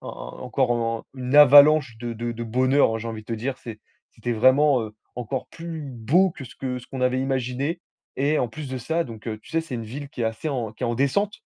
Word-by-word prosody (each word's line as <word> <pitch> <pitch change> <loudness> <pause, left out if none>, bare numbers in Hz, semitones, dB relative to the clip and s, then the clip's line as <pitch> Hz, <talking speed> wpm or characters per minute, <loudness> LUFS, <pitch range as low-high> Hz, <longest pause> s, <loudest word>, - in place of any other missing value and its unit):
en - - -8
encore 130 0 0
un 115 -1 -1 0.2
une 130 +1 -3
avalanche 145 -2 +7
de 120 0 -4
de 120 +1 -4
de 115 0 -5
bonheur, 130 0 +2
j'ai 115 - -5
envie 110 -1 -6
de - - -25
te - - -4
dire, 125 +4 -3
c'est 110 -2 -9 0.3
c'était 120 - -3
vraiment, 130 +3 +4
heu, 110 -1 -7 0.2
encore 125 +2 -4
plus 165 -1 -7
beau 140 +8 +2
que 145 -5 -9
ce - - -12
que 130 -1 -4
ce 125 - -14
qu'on 130 - -7
avait 125 0 +2
imaginé. 135 +3 -2 0.4
Et 145 +3 +1
en - - +1
plus 145 +5 -7
de 130 0 -4
ça, 160 +8 -1
donc, 115 -2 -10
heu, 110 -1 -3
tu - - -15
sais, 165 0 +1
c'est 160 -6 -7
une 115 - -4
ville 140 +6 -7
qui 125 - -9
est - - +1
assez 110 +7 -2
en 120 -7 -3
qui 125 - -5
est - - +1
en 120 - 0
descente. 200 - 0
130 Hz, 250 wpm, -24 LUFS, 115-145 Hz, 0.4 s, avalanche